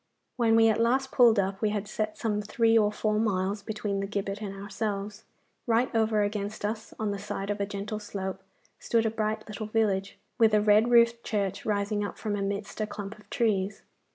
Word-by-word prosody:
When 230 Hz, -3 st, +3 dB
we 225 Hz, 0 st, +6 dB
at 220 Hz, 0 st, +2 dB
last 260 Hz, +3 st, +2 dB
pulled 235 Hz, -3 st, +6 dB
up 195 Hz, 0 st, 0 dB
we 215 Hz, -, +2 dB
had 210 Hz, -1 st, -2 dB
set 215 Hz, 0 st, -3 dB
some 210 Hz, -3 st, -1 dB
three 225 Hz, +2 st, +2 dB
or 210 Hz, -2 st, +4 dB
four 215 Hz, 0 st, 0 dB
miles 200 Hz, -1 st, 0 dB
between 205 Hz, -1 st, -3 dB
the 195 Hz, -, -2 dB
gibbet 200 Hz, 0 st, -3 dB
and 200 Hz, -2 st, -5 dB
ourselves. 205 Hz, +1 st, -4 dB, 0.4 s
Right 235 Hz, +2 st, +2 dB
over 220 Hz, -2 st, +2 dB
against 205 Hz, 0 st, -3 dB
us, 220 Hz, +1 st, -4 dB
on 215 Hz, -1 st, -1 dB
the 200 Hz, -, -4 dB
side 200 Hz, 0 st, -4 dB
of 205 Hz, 0 st, -3 dB
a 200 Hz, -, 0 dB
gentle 205 Hz, +1 st, -4 dB
slope, 190 Hz, -2 st, -5 dB, 0.4 s
stood 230 Hz, -1 st, +1 dB
a 220 Hz, -, +1 dB
bright 215 Hz, -1 st, -2 dB
little 215 Hz, 0 st, -5 dB
village, 205 Hz, -3 st, 0 dB, 0.2 s
with 220 Hz, -2 st, +5 dB
a -, -, +5 dB
red 210 Hz, +2 st, +4 dB
roofed 235 Hz, -1 st, +4 dB
church 200 Hz, -2 st, -2 dB
rising 205 Hz, 0 st, 0 dB
up 205 Hz, -, -5 dB
from 210 Hz, -2 st, -2 dB
amidst 200 Hz, +1 st, -3 dB
a 215 Hz, -, 0 dB
clump 210 Hz, 0 st, -7 dB
of 205 Hz, -1 st, -20 dB
trees. 200 Hz, -4 st, 0 dB
210 Hz, 205 wpm, -28 LUFS, 200-220 Hz, 0.4 s, we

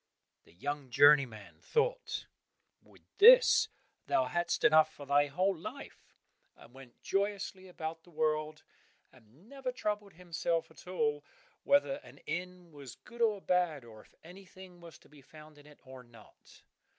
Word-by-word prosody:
The -, -, -22 dB
young 145 Hz, +8 st, -5 dB
journeyman 135 Hz, -6 st, +3 dB
thought, -, -, -2 dB, 0.6 s
"With -, -, -23 dB, 0.2 s
this -, -, +7 dB, 0.4 s
thou 130 Hz, -, +2 dB
hast 175 Hz, +6 st, -2 dB
enough 155 Hz, -9 st, +5 dB
for 145 Hz, -, -12 dB
thy 145 Hz, +1 st, +2 dB
whole 185 Hz, +7 st, 0 dB
life," 165 Hz, -, -11 dB, 0.4 s
and 120 Hz, -, -18 dB
went 130 Hz, -2 st, -15 dB
joyously 195 Hz, -1 st, -3 dB
about 165 Hz, -2 st, -7 dB
the 175 Hz, -, -21 dB
world 155 Hz, -1 st, -2 dB, 0.5 s
and 130 Hz, -, -22 dB
never 270 Hz, -1 st, -5 dB
troubled 210 Hz, -4 st, -4 dB
himself 165 Hz, -1 st, -3 dB
at 160 Hz, -, -17 dB
all 150 Hz, -5 st, -1 dB, 0.4 s
whether 280 Hz, -1 st, +2 dB
an 290 Hz, -, -16 dB
inn 180 Hz, +1 st, -6 dB
was 140 Hz, -4 st, -11 dB
good 235 Hz, -1 st, -13 dB
or 215 Hz, -4 st, +1 dB
bad, 175 Hz, -9 st, 0 dB
or 110 Hz, -2 st, -14 dB
if -, -, -25 dB
anything 185 Hz, 0 st, -14 dB
was 165 Hz, -2 st, -13 dB
to -, -, -23 dB
be 145 Hz, -1 st, -18 dB
found 155 Hz, +1 st, -16 dB
in 145 Hz, -, -18 dB
it 150 Hz, -, -18 dB
or 130 Hz, 0 st, -12 dB
not. 115 Hz, -3 st, -20 dB
160 Hz, 150 wpm, -31 LUFS, 145-190 Hz, 0.6 s, this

